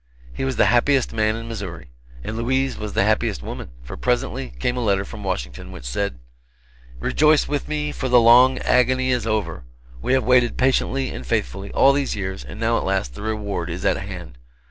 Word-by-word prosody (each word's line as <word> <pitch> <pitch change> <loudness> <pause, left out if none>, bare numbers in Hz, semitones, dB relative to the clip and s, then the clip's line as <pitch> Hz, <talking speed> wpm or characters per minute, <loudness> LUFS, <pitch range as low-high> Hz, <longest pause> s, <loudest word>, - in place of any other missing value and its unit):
He - - -4
was 135 -1 -1
the - - +4
happiest 130 +2 +2
man 110 0 +1
in 115 +1 -7
Missouri. 90 - -7 0.3
And 110 - -5
Louise 130 +3 0
was 105 -1 -6
the - - +2
happiest 105 - 0
woman; - - -7
for - - -8
presently 65 +1 -1
came 120 - -1
a - - -2
letter 100 -2 +1
from 105 0 -9
Washington 60 -11 -4
which - - -10
said: 65 +6 -2 0.8
"Rejoice 150 - +3
with 145 -1 -2
me, 150 -1 -2
for 130 - -3
the 125 0 +7
long 120 +3 +6
agony 130 +1 +2
is 120 -3 0
over! 100 - -2 0.4
We 125 - 0
have 130 -1 +3
waited 125 -1 +3
patiently 130 +1 +1
and 65 - -7
faithfully, - - -2
all 140 - +5
these 140 0 -1
years, 95 -1 -4
and - - -10
now 115 +1 +1
at - - -4
last 95 -11 -1
the - - -9
reward 105 -5 -3
is 90 +3 -5
at - - +3
hand. 90 -10 -8
110 Hz, 200 wpm, -22 LUFS, 95-130 Hz, 0.8 s, the